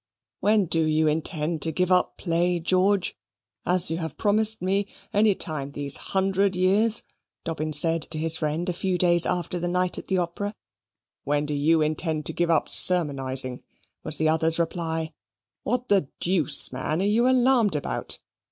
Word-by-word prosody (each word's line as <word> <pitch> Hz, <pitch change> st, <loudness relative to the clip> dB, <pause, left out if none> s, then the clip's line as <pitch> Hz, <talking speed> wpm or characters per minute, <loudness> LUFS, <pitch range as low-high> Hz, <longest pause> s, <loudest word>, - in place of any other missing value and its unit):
"When 210 Hz, -1 st, +2 dB
do 165 Hz, 0 st, +1 dB
you 155 Hz, 0 st, +1 dB
intend 155 Hz, +1 st, -2 dB
to 160 Hz, -, +1 dB
give 180 Hz, +3 st, -1 dB
up 180 Hz, 0 st, +1 dB
play, 175 Hz, 0 st, -1 dB
George, 185 Hz, +3 st, +1 dB, 0.5 s
as 180 Hz, -2 st, +1 dB
you 165 Hz, -, -3 dB
have 160 Hz, -3 st, -6 dB
promised 215 Hz, +1 st, +2 dB
me, 195 Hz, +2 st, -1 dB, 0.3 s
any 205 Hz, -1 st, +3 dB
time 145 Hz, -5 st, -4 dB
these 145 Hz, -1 st, +3 dB
hundred 195 Hz, 0 st, -1 dB
years?" 200 Hz, +5 st, +1 dB, 0.4 s
Dobbin 155 Hz, -1 st, -4 dB
said 165 Hz, +1 st, +3 dB
to 160 Hz, -, -4 dB
his 160 Hz, +1 st, +2 dB
friend 160 Hz, +3 st, -3 dB
a 180 Hz, -, -1 dB
few 185 Hz, +1 st, -2 dB
days 175 Hz, -1 st, +4 dB
after 180 Hz, 0 st, -3 dB
the 175 Hz, -, -3 dB
night 180 Hz, 0 st, 0 dB
at -, -, -12 dB
the 190 Hz, -, 0 dB
Opera. 185 Hz, +4 st, -4 dB, 0.7 s
"When 145 Hz, +1 st, -1 dB
do 150 Hz, -, -3 dB
you 155 Hz, +2 st, +2 dB
intend 155 Hz, 0 st, -2 dB
to -, -, -2 dB
give 175 Hz, 0 st, -1 dB
up 165 Hz, -2 st, +1 dB
sermonising?" 135 Hz, -7 st, +3 dB, 0.4 s
was 155 Hz, -, 0 dB
the 155 Hz, 0 st, +1 dB
other's 160 Hz, +1 st, +2 dB
reply. 165 Hz, -1 st, -3 dB, 0.5 s
"What 250 Hz, +1 st, -3 dB
the 195 Hz, -8 st, +1 dB
deuce, 170 Hz, -8 st, +2 dB
man, 150 Hz, +5 st, -3 dB
are 195 Hz, -, 0 dB
you 230 Hz, +5 st, +2 dB
alarmed 250 Hz, -6 st, +2 dB
about? 145 Hz, -, -4 dB
170 Hz, 170 wpm, -24 LUFS, 155-190 Hz, 0.7 s, days